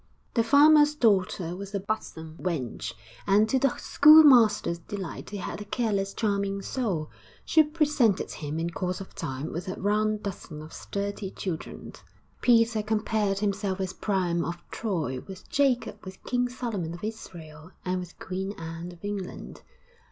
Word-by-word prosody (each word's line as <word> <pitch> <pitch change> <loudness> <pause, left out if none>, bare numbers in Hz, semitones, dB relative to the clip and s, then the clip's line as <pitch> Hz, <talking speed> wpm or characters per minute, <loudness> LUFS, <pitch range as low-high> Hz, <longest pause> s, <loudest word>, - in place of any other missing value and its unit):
The 230 - +3
farmer's 295 +4 +6
daughter 190 - +1
was 200 +2 -7
a - - 0
buxom 165 -6 -5
wench, 155 -10 -3 0.3
and, 205 +2 +5
to 265 - +2
the 275 -1 +1
schoolmaster's 270 - +6
delight 190 +1 -6
he 205 - -5
had 200 - -5
a - - -7
careless, 205 -3 -1
charming 200 -2 -1
soul 190 -13 -2 0.3
she 320 - +5
presented 300 - +1
him 150 0 -5
in 170 +1 -2
course 180 +1 -3
of 195 - -10
time 140 -1 -4
with 170 +3 -5
a 185 - -4
round 215 +1 +1
dozen 165 -6 -6
of 155 - -12
sturdy 200 0 -4
children. 180 -4 -6 0.5
Peter 230 -2 +4
compared 210 -2 0
himself 200 -1 -1
with 190 -1 -5
Priam 180 -4 +1
of 170 - -3
Troy, 160 - -2
with 190 -1 -10
Jacob, 275 -3 +1
with 190 0 -10
King 245 0 0
Solomon 210 -10 -4
of 175 - -12
Israel 165 -7 -8 0.2
and 185 0 0
with 180 -1 -9
Queen 190 +2 -4
Anne 165 0 -7
of 175 +2 -12
England. 205 -3 -6
200 Hz, 155 wpm, -27 LUFS, 175-225 Hz, 0.5 s, farmer's